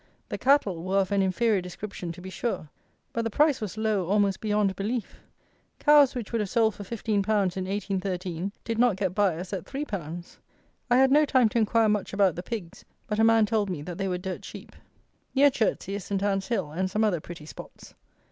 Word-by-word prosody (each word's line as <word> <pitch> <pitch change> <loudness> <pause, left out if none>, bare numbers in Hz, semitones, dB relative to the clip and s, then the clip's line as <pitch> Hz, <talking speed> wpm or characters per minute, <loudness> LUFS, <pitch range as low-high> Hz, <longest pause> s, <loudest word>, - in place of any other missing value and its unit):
The - - -3
cattle 255 - +3
were 190 +2 0
of 195 -1 +1
an 200 -1 +3
inferior 195 +2 +2
description 180 0 -6
to 180 - -12
be 190 +1 -8
sure; 185 -6 -3 0.4
but 230 - 0
the 225 - -1
price 290 +4 +2
was 215 0 -5
low 215 -5 0
almost 200 0 +1
beyond 210 -2 +1
belief. 220 +3 -3 0.6
Cows, 295 -3 +5
which 235 -5 -5
would 230 -2 0
have 205 - -3
sold 225 -1 +2
for - - -10
15_l._ 220 +1 -3
in - - +3 0.4
1813, 190 -2 -3
did 230 -1 -3
not 240 -4 +4
get 190 -2 -1
buyers 185 -2 0
at 195 - -4
3_l._ 175 - -6 0.5
I 245 - +5
had 265 0 +5
no 300 +2 +6
time 260 -5 +3
to 235 - 0
inquire 225 +1 +3
much 210 -2 0
about 195 -3 +3
the 175 - -4
pigs, 185 -5 -7 0.2
but 210 0 -2
a - - +5
man 225 -1 +5
told 210 -2 0
me 160 -6 -4
that 175 +3 -7
they 195 - -1
were 180 -1 -1
dirt 185 +1 -5
cheap. - - -10 0.6
Near 280 +1 +6
Chertsey 215 -5 -1
is 200 -2 -4
Saint 200 -1 -2
Anne's 195 -1 0
Hill 195 -11 -1
and 185 +4 -1
some 210 +3 0
other 200 -6 +2
pretty 165 -2 -10
spots. - - -12
200 Hz, 210 wpm, -27 LUFS, 185-225 Hz, 0.6 s, no